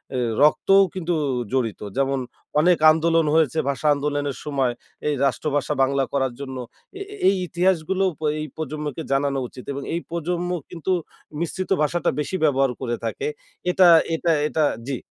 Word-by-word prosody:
এ - - 0 0.2
রক্তও 195 +6 +5
কিন্তু 175 -1 -1 0.4
জড়িত। 120 -5 -1 0.2
যেমন 135 0 +1 0.4
অনেক 175 +2 +4
আন্দোলন 165 +1 +2
হয়েছে 160 0 +2
ভাষা 140 +2 -1
আন্দোলনের 145 -1 -2
সময়। 135 -4 0 0.3
এই 150 - +1
রাষ্ট্রভাষা 145 +2 0
বাংলা 135 0 +1
করার 135 -3 0
জন্য। 130 -2 -6 0.4
এ - - -7 0.3
এই 195 - +5
ইতিহাসগুলো 185 +2 +1 0.2
প - - -31 0.2
এই 155 - -3
প্রজন্মকে 150 0 -4
জানানো 140 0 +1
উচিত 125 +1 -12
এবং 140 - -5
এই 170 - -1
প্রজন্ম 175 +1 -2 0.2
কিন্তু 175 +1 -4 0.5
মিশ্রিত 175 +3 -3
ভাষাটা 170 +4 +1
বেশি 150 +5 -2
ব্যবহার 135 -3 +3
করে 120 -2 -1
থাকে। 435 - -3 0.4
এটা 180 0 +5 0.3
এটা 165 +1 +1 0.2
এটা 155 0 0 0.2
জ্বি। 135 - -2
150 Hz, 150 wpm, -23 LUFS, 135-170 Hz, 0.5 s, রক্তও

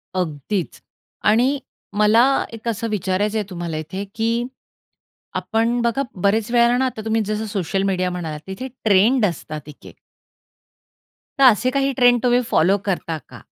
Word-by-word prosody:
अगदीच. 175 +2 -3 0.4
आणि 250 +6 +3 0.4
मला 215 +3 +5 0.3
एक 225 +1 -9
असं 230 0 -1
विचारायचंय 205 +2 0
तुम्हाला 170 -3 -4
इथे, 170 +6 -5
की 230 +2 0 0.9
आपण 230 +2 0
बघा 235 +3 +1 0.2
बरेच 215 +3 +2
वेळेला 240 0 +4
ना, 265 - +2
आता 235 -4 -3
तुम्ही 220 0 +1
जसं 215 +1 -2
सोशल 195 -1 -2
मीडिया 185 -2 0
म्हणालात, 160 -4 -5
तिथे 225 +8 -5 0.2
ट्रेंड 215 +4 +4
असतात 155 -4 -5
एक, 145 - -14
एक - - -12 1.4
तर - - +5
असे 245 +1 +5
काही 275 +1 +1
ट्रेंड 245 -1 +4
तुम्ही 245 0 +3
फॉलो 190 +5 +4
करता 170 -4 -2
का? - - -12
215 Hz, 145 wpm, -21 LUFS, 185-235 Hz, 1.4 s, मला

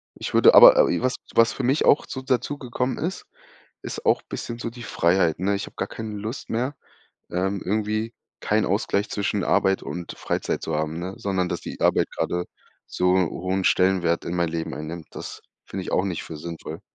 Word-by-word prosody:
ich - - -6
würde - - +7
aber - - +10
aber - - +5
was 130 0 +1 0.2
was 115 0 +4
für 135 - -4
mich 135 +5 +2
auch 145 - +5
so 130 - -5
dazugekommen 130 -1 -2
ist, 175 +6 -4 0.6
ist - - -6
auch - - +3
bisschen 120 - -6
so 115 - -3
die 120 +1 -10
Freiheit, 85 -6 +2
ne? 100 +2 +1
Ich 100 - -4
hab - - -15
gar 95 - -2
keine 110 -2 -6
Lust 110 +5 -6
mehr, 125 +5 -1 0.5
ähm, 95 +2 -1
irgendwie 110 +3 -1 0.3
keinen - - +1
Ausgleich 100 +1 0
zwischen 100 -1 -1
Arbeit 95 0 +2
und 90 -1 -6
Freizeit - - -2
zu 80 - -2
haben, 80 +1 -2
ne, 90 +2 -5
sondern 95 -2 -1
dass 85 - -3
die - - -8
Arbeit - - +2
gerade 90 0 -2 0.4
so 90 0 +2
hohen 95 +1 0
Stellenwert 90 -3 +2
in 85 - -3
mein 85 -1 +1
Leben 80 0 -3
einnimmt, 80 +2 -7
das - - -8 0.2
finde 95 -1 -6
ich - - -5
auch 90 - +2
nicht 95 -4 -3
für 80 - -8
sinnvoll. 80 0 -7
95 Hz, 195 wpm, -24 LUFS, 85-115 Hz, 0.6 s, aber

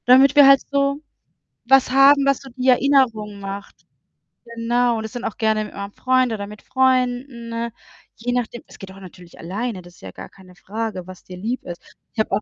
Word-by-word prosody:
Damit 265 +3 +6
wir 285 -1 +8
halt 275 -1 +7
so 280 +1 0 0.6
was 265 0 +4
haben, 275 +1 +6
was 275 -1 +2
so 270 - -12
die 255 +1 -4
Erinnerung 245 -6 +2
macht. 200 0 -8 0.7
Genau, 235 0 0
das 220 0 -7
sind 245 - -6
auch - - -4
gerne 220 -1 0
mit - - -12
meinem 200 0 -7
Freund 255 +1 +1
oder 200 -2 -5
mit 210 +1 -12
Freunden, 255 -2 0
ne, 230 0 -4 0.4
je 240 +2 -4
nachdem. 240 -1 -3
Es - - -16
geht 195 -1 -10
auch 190 - -14
natürlich 180 -2 -14
alleine, 195 +4 -4
das 175 0 -16
ist - - -21
ja 95 - -9
gar 95 - -11
keine 185 -2 -18
Frage, 215 -1 -5
was 185 -1 -12
dir 180 - -11
lieb 230 +7 -4
ist. 175 -1 -8 0.3
Ich - - -8
habe 220 - 0
auch 210 - -1
230 Hz, 210 wpm, -21 LUFS, 200-255 Hz, 0.7 s, wir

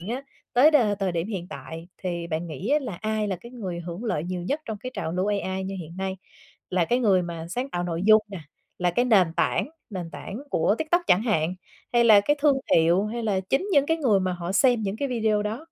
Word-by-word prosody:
hiện 185 +6 -6
á 270 - -7 0.3
tới 265 +6 +6
đ 305 - +6 0.2
thời 190 -2 0
điểm 170 +1 -1
hiện 190 -5 -4
tại 165 +1 -8
thì 170 -2 -3
bạn 165 +1 -3
nghĩ 165 - -6
á 295 - +5
là 235 -8 -5
ai 215 -1 -1
là 190 - -1
cái 235 +8 -13
người 190 -8 -5
hưởng 175 +5 -7
lợi 160 -9 -1
nhiều 180 0 -4
nhất 280 - -2
trong 220 -2 -5
cái 255 +5 -6
trào 160 - -3
lưu 185 +2 0
AI 190 -2 -1
như 195 +1 -4
hiện 165 +1 -10
nay? 190 0 -3 0.5
Là 180 -2 +2
cái 240 +9 +1
người 200 -7 +3
mà 170 -1 -6
sáng 250 +9 -3
tạo 175 - -2
nội 170 0 -3
dung 215 +1 +7
nè, 195 - -7 0.4
là 180 -1 +2
cái 245 +8 +1
nền 195 -9 +4
tảng - - +1 0.2
nền 180 -4 -5
tảng 200 - -7
của 165 +1 +2
TikTok 330 +3 +1
chẳng 185 - +4
hạn, 180 -7 0 0.4
hay 240 -1 +4
là 215 -3 +8
cái 290 +9 +1
thương 285 -2 +4 0.2
hiệu 170 +4 +4
hay 235 +2 -4
là 200 -4 0
chính 375 +10 +1
những 285 -3 +4
cái 325 - +2
người 240 -11 +2
mà 185 -1 0
họ 175 0 -4
xem 240 +2 +3
những 200 0 -2
cái 280 +4 -2
video 220 -4 +1
đó? 210 +2 -3
195 Hz, 250 wpm, -25 LUFS, 175-235 Hz, 0.5 s, là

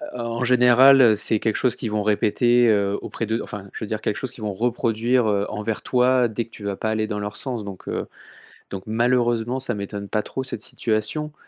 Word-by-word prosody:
Heu, - - -6
en - - -2 0.2
en - - 0
général, 125 +2 +6
heu, 115 -4 +6
c'est 105 +1 +1
quelque 110 0 -1
chose 125 -3 +1
qu'ils 110 - -5
vont 105 0 0
répéter, 120 +3 +3
heu, 100 -2 +2
auprès 115 - -4
de 110 +2 -1
enfin, 100 -1 -8
je - - -6
veux - - -4
dire 110 +1 -4
quelque 105 - -1
chose 130 - -4
qu'ils 120 - -11
vont 105 -1 -2
reproduire, 120 +2 +1
heu, 100 -1 +1
envers 105 +1 -4
toi 125 0 +3
dès 115 +1 -3
que - - -25
tu 105 - -11
vas 100 -1 -2
pas 110 - -3
aller 110 0 0
dans 105 -1 -4
leur 105 0 -5
sens 125 -5 -4
donc, 100 -2 -9
heu, - - -3 0.6
donc 95 -1 -6
malheureusement, 120 +1 +1
ça 130 -2 0
m'étonne 100 0 -6
pas 105 - 0
trop 130 - -5
cette 115 - -5
situation 120 +9 -2
110 Hz, 235 wpm, -23 LUFS, 105-125 Hz, 0.6 s, général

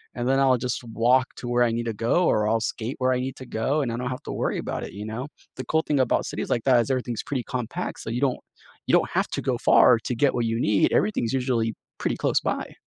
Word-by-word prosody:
and 120 0 -2
then 135 +1 +3
I'll 130 -2 +4
just 125 0 -3
walk 120 +3 +2
to 120 - -7
where 120 0 +2
I 115 - +2
need 115 +1 -2
to 115 - -2
go, 120 - +1
or 105 0 +2
I'll 115 0 +2
skate 115 +3 -3
where 130 -1 +2
I 125 - 0
need 130 +1 -4
to 130 - -9
go 135 +8 -1
and 120 -4 -2
I 115 - -3
don't 125 +1 -3
have 125 - -6
to - - -6
worry - - -1
about - - -4
it, - - -8
you 105 +1 -7
know? 115 +6 -5 0.3
The 130 - -6
cool 160 0 +1
thing 145 -3 +1
about 130 - +2
cities - - -4
like 115 - 0
that, 130 -3 +5
is 125 - -4
everything's 125 -3 -1
pretty 135 -4 -3
compact, 125 +8 -4
so - - -6
you 120 +3 -2
don't 135 -3 +1 0.5
you - - 0
don't - - +4
have - - +1
to - - -3
go - - 0
far 120 -2 +6
to 120 +1 -3
get 140 +3 +2
what 120 -2 0
you 115 +1 -1
need. 105 -4 +2
Everything's 120 - +1
usually 120 -4 0 0.2
pretty - - -1
close - - +1
by. - - -3
125 Hz, 275 wpm, -25 LUFS, 115-130 Hz, 0.5 s, far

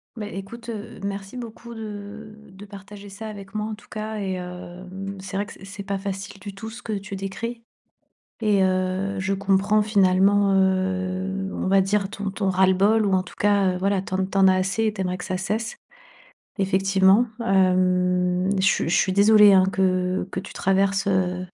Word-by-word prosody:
Beh, 210 -2 -6
écoute, 230 +5 -8
heu, 220 -1 -7
merci 200 +3 -5
beaucoup 235 0 -8
de 215 0 -8 0.2
de 195 +2 -12
partager 200 0 -11
ça 210 +3 -8
avec 200 -1 -10
moi 215 0 -1
en 220 - -4
tout 210 0 -13
cas 215 0 -5
et 195 -2 -2
hem, 185 +2 -7
c'est 190 +1 -6
vrai 205 - -2
que - - -10
c'est 195 - -13
c'est 200 0 -8
pas 200 0 -2
facile 195 0 -6
du 200 0 -8
tout 220 +3 -7
ce 235 +3 -11
que 220 - -3
tu 200 0 -5
décris. 230 +5 -5 0.8
Et 205 -3 +3
heu, 185 +1 0
je 190 +1 0
comprends 200 +2 +2
finalement, 200 -1 +3
heu, 190 0 0
on - - -3
va 195 0 +4
dire 195 0 0
ton 205 -1 -4
ton 195 0 -2
ras-le-bol 190 +4 +3
ou 195 - +1
en 185 - +3
tout 185 - -13
cas, 200 -2 +3
heu, - - -4
voilà 195 +1 +1
tu 185 - -6
en 190 0 +1
tu 195 +1 -2
en 190 -1 +6
as 185 - +5
assez 195 +4 0
et 215 - +1
tu 190 - -3
aimerais 180 0 -2
que 180 - -7
ça 185 - -2
cesse, 215 +5 -3 0.8
effectivement. 195 +2 +3 0.2
Hem, 180 -1 +2
je 190 - +2
suis 165 - +2
je 175 - +2
suis 190 - +2
désolée 210 +1 +7
hein, 185 -1 +6
que 185 -1 0
que - - -3
tu 190 - -9
traverses, 195 +1 +1
heu, 185 -1 0
195 Hz, 200 wpm, -23 LUFS, 185-205 Hz, 0.8 s, désolée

